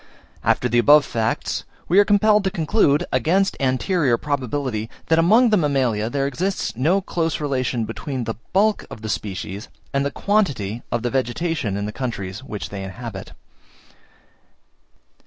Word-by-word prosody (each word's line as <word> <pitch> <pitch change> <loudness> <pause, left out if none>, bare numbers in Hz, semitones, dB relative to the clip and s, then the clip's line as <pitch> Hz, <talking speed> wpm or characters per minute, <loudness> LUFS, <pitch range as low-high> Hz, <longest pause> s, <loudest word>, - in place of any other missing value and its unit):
After - - +2
the 120 - +2
above 145 +4 +6
facts, 115 -1 -2 0.2
we 185 +4 +5
are - - +8
compelled 210 0 +4
to - - +3
conclude, 165 -2 +2
against 180 +10 +2
anterior 135 0 +1
probability, 130 -5 -2 0.2
that 165 0 +4
among 220 +8 +5
the 210 - +5
mammalia 130 - +1
there 135 +2 -1
exists 180 +6 -2
no 165 - +2
close 165 -3 -2
relation 130 -5 -1
between 130 +1 -4
the 115 0 -3 0.2
bulk 210 +3 +2
of 110 - -10
the 110 - -4
species, 100 +1 -4 0.3
and 140 0 +1
the 140 - 0
quantity 140 - 0
of 120 -1 -1
the 120 - -1
vegetation, 130 - -1
in 100 - -2
the 105 - -4
countries 105 -4 -5
which 105 -6 -6
they 100 -1 -6
inhabit. 95 0 -7
135 Hz, 155 wpm, -22 LUFS, 115-170 Hz, 0.3 s, are